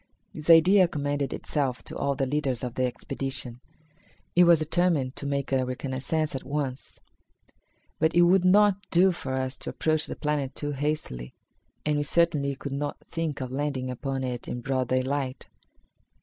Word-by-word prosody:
This 155 +2 -7
idea 180 +3 +7
commended 145 -3 -2
itself 135 -4 -2
to - - -7
all 140 0 0
the 135 - 0
leaders 135 -3 -1
of 125 -2 -3
the 130 +1 0
expedition. 135 -1 -4 0.7
It 175 0 +7
was 170 -1 +7
determined 155 -4 +1
to 140 - -4
make 140 -1 -2
a 130 -1 +2
reconnaissance 135 +5 -2
at 135 - -4
once. 140 -2 -4 1.0
But 160 +1 +2
it 175 - +7
would 180 +1 +4
not 200 +1 +5
do 185 +2 +5
for 130 -6 -4
us 130 0 -2
to - - -6
approach 155 -1 0
the - - -5
planet 145 -3 -2
too 145 0 -3
hastily, 140 - -3 0.5
and 150 -1 +1
we 145 - +1
certainly 145 -3 +1
could 140 +1 -6
not 145 +1 -3
think 165 -4 -3
of 130 -1 -4
landing 135 -2 -2
upon 135 +1 -3
it 125 -2 -4
in 125 - -4
broad 130 0 -1
daylight. 130 +1 -1
140 Hz, 170 wpm, -27 LUFS, 130-155 Hz, 1.0 s, idea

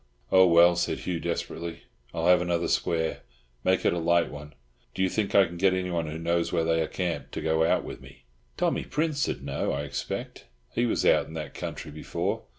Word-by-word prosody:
"Oh, 95 -1 +7
well," 85 +1 +6
said 85 - -1
Hugh 90 -2 -2
desperately, 85 0 -4 0.3
"I'll 85 -1 -2
have 90 0 +6
another 85 -1 0
square. 80 -1 0 0.4
Make 95 0 +2
it - - +4
a 85 - -1
light 85 0 +2
one. 75 0 -10 0.4
Do 95 - +1
you 95 - +2
think 105 -1 -1
I 100 -1 +7
can 85 0 -8
get 95 +1 +3
anyone 90 -3 -1
who 75 +1 -5
knows 85 +1 0
where 85 -2 +1
they 80 0 +2
are 80 - 0
camped 90 -3 -3
to - - -3
go 80 0 +2
out 80 - +2
with - - -8
me?" - - -15 0.3
"Tommy - - +1
Prince'd 150 - -1
know, 70 0 -2
I 70 +1 -2
expect. 70 -1 -5 0.3
He 120 +1 +1
was - - 0
out - - +4
in 80 - -10
that 75 -3 -5
country 75 - -6
before. 75 +1 -3
85 Hz, 210 wpm, -27 LUFS, 80-90 Hz, 0.4 s, Oh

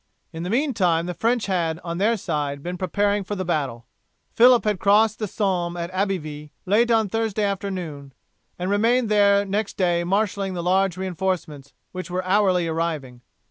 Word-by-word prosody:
In 160 - -6
the 175 - -4
meantime 200 - +1
the 180 - -3
French 230 +5 0
had, 170 -4 -1
on 170 0 -4
their 225 +3 +2
side, 145 -6 -3
been 180 +1 -4
preparing 205 +2 0
for 205 +2 -4
the 185 -1 -3
battle. 140 -8 -2 0.5
Phillip 245 +1 +6
had 210 -3 0
crossed 210 +3 +3
the 215 - -2
Somme 180 -4 -1
at 170 +1 -4
Abbeyville 165 -6 -3 0.2
late 220 +5 +3
on 225 -2 +3
Thursday 220 0 -1
afternoon, 185 -8 -4 0.5
and 180 +2 -2
remained 230 +3 +2
there 200 -1 +4
next 200 +2 -2
day 175 -2 +1
marshalling 195 0 -1
the 170 - -3
large 185 0 +1
reinforcements 185 -6 -3 0.2
which 185 0 -6
were 180 +1 -3
hourly 185 -3 +2
arriving. 160 -7 -3
185 Hz, 170 wpm, -23 LUFS, 170-205 Hz, 0.5 s, Phillip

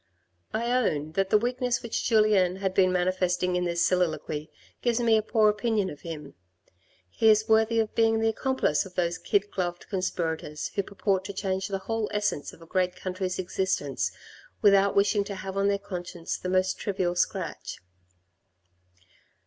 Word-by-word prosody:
I 235 +2 -1
own 155 - +1
that 195 +3 0
the 215 - +6
weakness 245 +2 -1
which 235 - -2
Julien 210 -5 +4
had 190 -1 -2
been 185 -1 +4
manifesting 180 0 +1
in 180 0 0
this 170 0 +1
soliloquy 160 -4 -1 0.3
gives 240 -1 +1
me 230 -2 +4
a 220 - +3
poor 220 0 +3
opinion 210 -1 +1
of 145 - -11
him. 150 -4 -7 0.7
He 220 - +2
is 215 0 +4
worthy 220 0 +3
of 220 -1 0
being 225 -1 +3
the 225 - +2
accomplice 240 - +1
of 185 -2 -13
those 170 -1 0
kid 205 0 0
gloved 175 -2 -3
conspirators 165 -5 -2
who 200 - +1
purport 195 -1 -1
to 200 - -5
change 190 -1 -2
the 195 - -2
whole 225 -2 -1
essence 205 -8 -1
of 165 - -15
a - - -13
great 180 +1 0
country's 185 0 -3
existence, 185 -6 -1 0.5
without 200 -1 +5
wishing 205 +1 +3
to 200 - -5
have 190 0 -6
on 195 0 +2
their 200 0 +2
conscience 175 -3 -5
the 185 - -5
most 185 0 +1
trivial 185 -3 -1
scratch. 175 - -2
190 Hz, 170 wpm, -27 LUFS, 180-215 Hz, 0.7 s, the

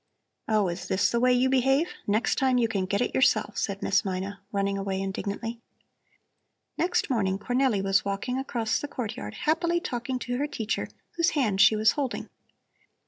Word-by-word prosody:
"Oh, 215 -3 +2
is 175 +1 -4
this 190 - +2
the 235 - +1
way 250 +1 +4
you 250 +1 +3
behave? 270 +4 +3 0.2
Next 210 +3 +1
time 260 -2 +3
you 235 -2 +3
can 195 -4 -2
get 200 +3 0
it - - -1
yourself," 260 - +2
said - - -2
Miss - - +2
Mina, 195 0 -4
running 200 -1 0
away 195 -1 -2
indignantly. 200 +4 -4 1.1
Next 350 -4 0
morning 195 -6 +1
Cornelli 245 -2 +1
was 195 +1 +2
walking 200 +6 -2
across 235 -4 -1
the 290 - -4
courtyard, 215 - -5
happily 340 +2 +2
talking 255 -5 -3
to 245 0 -3
her 290 - 0
teacher, 220 -6 -2 0.3
whose 335 - +4
hand 210 -8 +2
she 220 - +7
was 215 +1 +4
holding. 275 -4 -3
230 Hz, 175 wpm, -27 LUFS, 200-260 Hz, 1.1 s, she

